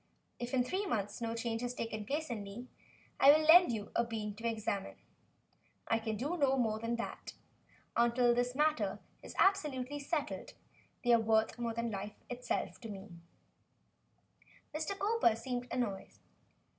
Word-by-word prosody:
If 245 +2 -3
in 250 - +4
three 380 +10 -2
months 205 - -2
no 230 0 -2
change 230 0 -2
has 245 0 -3
taken 220 -3 -4
place 300 0 -2
in 225 -3 -3
me, 200 +5 -8 0.5
I 275 - +9
will 310 +1 +4
lend 350 -1 +8
you 210 -3 -4
a 235 - +3
bean 220 -3 -4
to 230 +1 -3
examine. 215 -3 -2 0.9
I 225 - +2
can 220 -1 -3
do 295 +10 -2
no 270 -3 +3
more 220 -3 +1
than 230 +1 -1
that. 235 - -6 0.6
Until 240 +1 +4
this 245 +1 0
matter 305 +2 +1 0.2
is - - -10
absolutely 290 -8 +2
settled, 295 +1 -3 0.5
they 245 -1 +5
are 230 - +6
worth 220 +1 +2
more 230 -1 -2
than 235 0 -1
life 205 +1 -5 0.2
itself 245 +1 -3
to 225 - -7
me." 195 -1 -8 1.6
Mr. 315 +6 -2
Cowper 410 - +3
seemed 245 +1 -4
annoyed. 215 -6 -2
235 Hz, 160 wpm, -34 LUFS, 225-275 Hz, 1.6 s, I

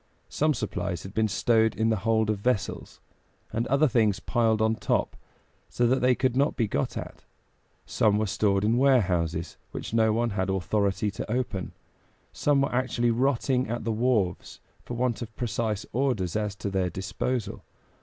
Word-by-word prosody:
Some 155 0 +1
supplies 90 -6 -3
had 95 - -9
been 110 0 +2
stowed 110 +2 +2
in 110 0 +1
the 110 - +2
hold 110 -1 +1
of 105 - -3
vessels, 115 -1 -2 0.5
and 115 +1 -1
other 140 +5 +3
things 110 -6 +2
piled 110 0 +1
on 110 0 +2
top - - -1 0.5
so 120 - 0
that 130 +3 +2
they 125 0 +4
could 130 -1 0
not 140 +3 +2
be 115 - 0
got 70 -8 -2
at; - - -8 0.6
some 105 -2 +2
were 110 - +1
stored 100 0 +1
in 115 +3 +2
warehouses 90 - +1
which - - -7
no 110 -1 +3
one 115 +1 0
had 95 -1 -1
authority 100 +2 0
to 100 - -6
open; 120 -6 -2 0.6
some 145 -2 +2
were 140 - 0
actually 120 -1 +1
rotting 130 0 +1
at 120 +1 -3
the 115 - -1
wharves, 110 -5 0 0.2
for 120 - -7
want 120 -3 -1
of 110 -2 -7
precise 110 -3 -2
orders 120 -9 0
as 105 -2 -1
to 100 - -4
their 95 -2 0
disposal. 100 +5 -3
110 Hz, 175 wpm, -27 LUFS, 100-125 Hz, 0.6 s, they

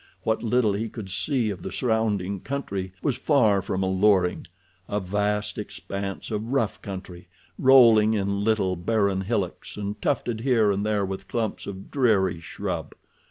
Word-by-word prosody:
What 110 0 0
little 115 -2 +2
he 110 +3 -2
could 105 -5 -8
see 115 - 0
of 95 - -7
the - - -6
surrounding 105 -5 0
country 100 -7 -4
was 135 -4 0
far 115 -10 +3
from 95 0 -2
alluring—a 95 -1 0
vast 105 +2 -1
expanse 100 -1 -5
of 110 +1 -2
rough 115 -7 0
country, 95 -2 -8 0.3
rolling 115 -5 +6
in 100 0 -1
little, 105 -4 +1
barren 100 +1 +1
hillocks, 95 -3 -3
and 105 0 -4
tufted 120 -5 -1
here 115 -5 +3
and 100 +1 -1
there 105 -2 +1
with 95 0 -6
clumps 115 -3 -3
of 95 -1 -8
dreary 100 -10 +2
shrub. 80 - -5
105 Hz, 150 wpm, -25 LUFS, 95-110 Hz, 0.3 s, rolling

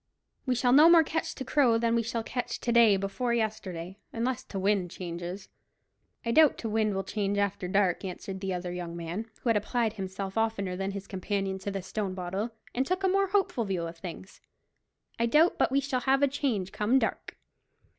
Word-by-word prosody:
"We 255 - +2
shall 245 +1 +2
no 305 +4 +8
more 335 -1 +8
catch 320 +1 -3
t' 265 - -6
Crow 255 -4 +3
than 230 0 +1
we 235 - +3
shall 230 0 -3
catch 245 +2 -4
t' 240 - -1
day 230 -4 +6
before 235 +5 -1
yesterday, 190 -5 -3
unless 245 +2 -2
t' 195 - -7
wind 190 -2 +1
changes." 175 +2 -6 0.8
"I 230 - 0
doubt 310 +3 +5
t' 230 - -4
wind 215 -2 +1
will 195 - -1
change 200 +1 -2
after 200 -2 -1
dark," 190 -1 +1
answered 190 +1 -6
the 195 -1 -2
other 180 -1 -3
young 175 -1 -5
man, 175 +7 -5
who 240 - +1
had 225 - +4
applied 225 +1 0
himself 195 0 -4
oftener 200 -5 -1
than 195 +1 -2
his 200 0 -6
companion 195 0 -2
to 195 - -4
the 195 -2 -4
stone 195 0 -3
bottle, 190 +5 -3 0.2
and 255 - +1
took 370 +1 -1
a - - +4
more 390 +1 +2
hopeful 375 - +1
view 190 -5 -2
of 165 0 -5
things. 185 +2 -9 0.8
"I 235 - +2
doubt 310 +8 +4
but - - +3
we 275 - +3
shall 270 -2 -1
have 270 +2 +2
a - - +6
change 245 -9 -1
come 220 +5 +2
dark." - - -2
210 Hz, 205 wpm, -29 LUFS, 190-245 Hz, 0.8 s, no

